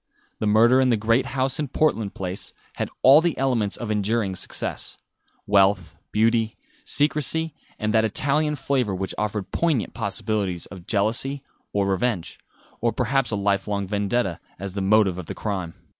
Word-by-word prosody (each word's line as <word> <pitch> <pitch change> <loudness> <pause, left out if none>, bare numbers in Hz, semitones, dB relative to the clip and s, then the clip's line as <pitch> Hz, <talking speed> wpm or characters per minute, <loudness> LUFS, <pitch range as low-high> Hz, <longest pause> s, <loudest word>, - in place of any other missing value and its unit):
The 110 - 0
murder 115 +5 +5
in 130 - +3
the 115 - +3
great 115 +4 +2
house 135 +1 0
in 150 - -1
Portland 125 -7 0
Place 95 0 -4 0.2
had - - -2
all 140 +4 +8
the 170 -1 0
elements 120 -6 0
of 115 -3 -4
enduring 105 -1 0
success - - -2 0.5
wealth, 95 -4 +3 0.2
beauty, 110 0 +2 0.3
secrecy, 155 +2 0 0.2
and 110 -1 -1
that 110 0 +4
Italian 145 +7 +1
flavour 130 -7 0
which 95 0 -3
offered 105 -2 -2
poignant 160 -9 0
possibilities 100 -4 -2
of 95 -3 -12
jealousy 120 +7 +1 0.3
or 100 -1 +1
revenge, 100 -1 -1 0.4
or 115 0 +1
perhaps 135 +3 0
a 105 - +1
life 100 -1 0
long 100 -1 -1
vendetta, 100 -1 -1 0.2
as 95 0 -6
the 100 - -3
motive 95 -2 +3
of 90 - -7
the - - -5
crime. 95 -6 -4
110 Hz, 160 wpm, -24 LUFS, 100-130 Hz, 0.5 s, all